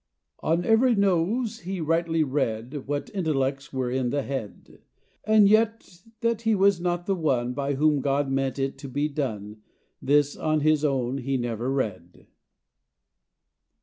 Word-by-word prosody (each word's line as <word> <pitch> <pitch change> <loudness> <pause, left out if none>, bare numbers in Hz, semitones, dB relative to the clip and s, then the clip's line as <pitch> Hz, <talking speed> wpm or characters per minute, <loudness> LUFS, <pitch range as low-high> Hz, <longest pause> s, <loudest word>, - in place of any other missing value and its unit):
On 170 +2 0
every 230 +2 +4
nose 200 +5 +1
he 190 -1 -5
rightly 165 0 +1
read 130 -1 -3
What 145 0 -3
intellects 140 -7 -1
were 130 -2 -2
in 130 -1 0
the 140 +2 -1
head 130 -8 -7 0.5
And 215 -1 +5
yet 215 -4 +1 0.2
that 230 -1 0
he 225 -1 +2
was 195 -2 +3
not 175 0 -1
the 195 - +1
one 130 -8 0
By 140 +1 -2
whom 150 0 +2
God 140 +1 0
meant 135 0 -1
it 135 0 -2
to 140 - -8
be 145 +3 -1
done, 110 -8 -4 0.4
This 145 +1 +2
on 155 -1 0
his 155 0 +2
own 135 -2 0
he 135 +1 -1
never 120 0 -3
read. 95 -10 -4
145 Hz, 150 wpm, -25 LUFS, 130-175 Hz, 0.5 s, And